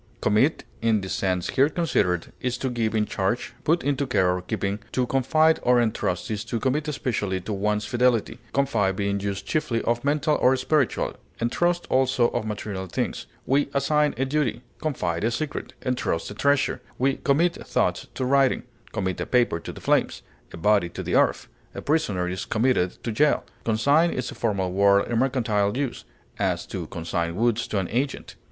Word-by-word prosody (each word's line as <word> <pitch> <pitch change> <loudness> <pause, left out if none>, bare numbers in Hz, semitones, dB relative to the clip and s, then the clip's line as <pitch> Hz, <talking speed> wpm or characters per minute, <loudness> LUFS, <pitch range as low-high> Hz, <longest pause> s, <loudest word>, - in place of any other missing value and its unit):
Commit, 110 +9 +2 0.2
in 110 -2 +2
the 95 - -6
sense 90 -2 -1
here 140 +2 +4
considered, 105 - 0
is 125 0 -1
to 130 0 -2
give 115 -2 -1
in 105 -1 +2
charge, 100 +3 -2
put 165 +2 +2
into 140 -1 0
care 90 -8 +2
or 90 - -4
keeping; 100 +1 -2
to 125 - +1
confide 155 +6 +3
or 125 0 +4
entrust 110 -5 -1
is 105 -1 -2
to 115 0 -3
commit 145 +5 0
especially 105 -9 -1
to 100 +4 -5
one's 105 +1 0
fidelity, 120 -1 +1
confide 115 -9 +1
being 100 0 -1
used 100 0 -3
chiefly 150 -7 0
of 120 +1 0
mental 150 +1 +2
or 130 +1 +5
spiritual, 150 -2 +1 0.3
entrust 175 +9 +1
also 130 -2 +3
of 115 -2 -3
material 100 -3 -4
things; 85 - -3 0.2
we 140 +2 +2
assign 150 +2 +2
a 135 - +1
duty, 130 -5 -1 0.2
confide 95 - -1
a 115 - +3
secret, 140 +5 -4
entrust 125 -9 -1
a - - -5
treasure; 140 +6 +1 0.2
we 135 +1 +1
commit 165 +5 +2
thoughts - - 0
to 130 - -1
writing; 135 0 +3 0.3
commit 95 -2 -2
a - - -3
paper 120 -9 +2
to - - -7
the - - -11
flames, - - +1 0.3
a - - -8
body 100 0 +3
to - - -6
the - - -3
earth; - - +2 0.3
a - - -5
prisoner 105 - 0
is 90 0 -3
committed 110 -6 +1
to 115 - -2
jail. 145 +7 +2 0.2
Consign 140 +9 +3
is 125 -6 -3
a - - -7
formal 100 -5 -1
word 100 +1 +4
in 115 - +2
mercantile 115 -5 +1
use; 140 -3 -3 0.3
as, - - 0
to - - -5
consign 85 0 -3
goods 120 0 +1
to 105 - -2
an 95 -2 0
agent. 135 +5 -2
120 Hz, 185 wpm, -25 LUFS, 100-135 Hz, 0.3 s, or